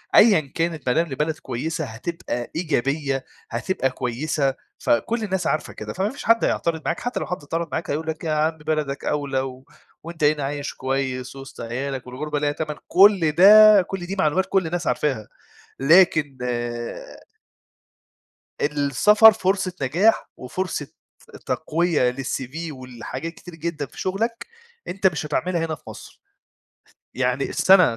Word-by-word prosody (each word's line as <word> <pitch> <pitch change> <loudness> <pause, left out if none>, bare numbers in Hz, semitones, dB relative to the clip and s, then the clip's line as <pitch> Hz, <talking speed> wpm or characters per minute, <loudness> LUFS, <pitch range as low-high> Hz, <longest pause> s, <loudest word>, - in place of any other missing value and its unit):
أيًا 200 - +6
كانت 165 -4 -2
بادام 165 +7 +2
لبلد 150 +3 -2
كويسة 155 +6 -4
هتبقى 120 0 -5
إيجابية 140 -4 -1 0.2
هتبقى 160 -8 -1
كويسة 135 +3 -1 0.2
فكل 225 - 0
الناس 190 -5 -1
عارفة 155 - -1
كده. - - -7
فما 190 +3 -1
فيش 280 +4 -9
حد 230 0 +4
هيعترض 165 -1 -1
معاك، - - -1
حتى 245 - -3
لو - - -3
حد 180 - -2
اعترض 165 +3 -4
معاك 160 +1 -3
هيقول 155 +3 -2
لك: 160 0 -4
"يا 160 - -1
عم 155 +1 +1
بلدك 150 -2 -2
أولى، 140 -2 -1
و 130 0 -7 0.4
وأنت 165 -1 -7
هنا 150 -1 +3
عايش 145 +1 -3
كويس 130 -1 -3
وِسط 135 0 -10
عيالك، 130 +3 -4
والغربة 145 +4 -3
ليها 145 0 +1
تمَن." 150 0 -4
كل 190 -4 +5
ده 210 +5 +8
كل 180 0 -5
دي 195 - -4
معلومات 175 +3 +2
كل 190 -4 +2
الناس 175 0 -3
عارفاها. 130 -8 -1 0.5
لكن 155 -2 +4 2.2
السفر 150 - +5
فرصة 190 -2 0
نجاح 175 +12 +2
وفرصة 155 +3 -4 0.6
تقوية 160 -6 +1
للCV 130 +1 -5 0.2
ولحاجات 130 +4 -7
كتير 175 -1 -12
جدًا 165 -2 -4
في - - -14
شغلك 225 +5 -2 0.4
أنت 190 +1 +1
مش 160 -4 -2
هتعملها 165 +2 -1
هنا 160 -1 -3
في - - -25
مصر. - - -11 0.9
يعني 125 +1 0
السنة 180 -11 +5
155 Hz, 145 wpm, -23 LUFS, 135-180 Hz, 2.2 s, ده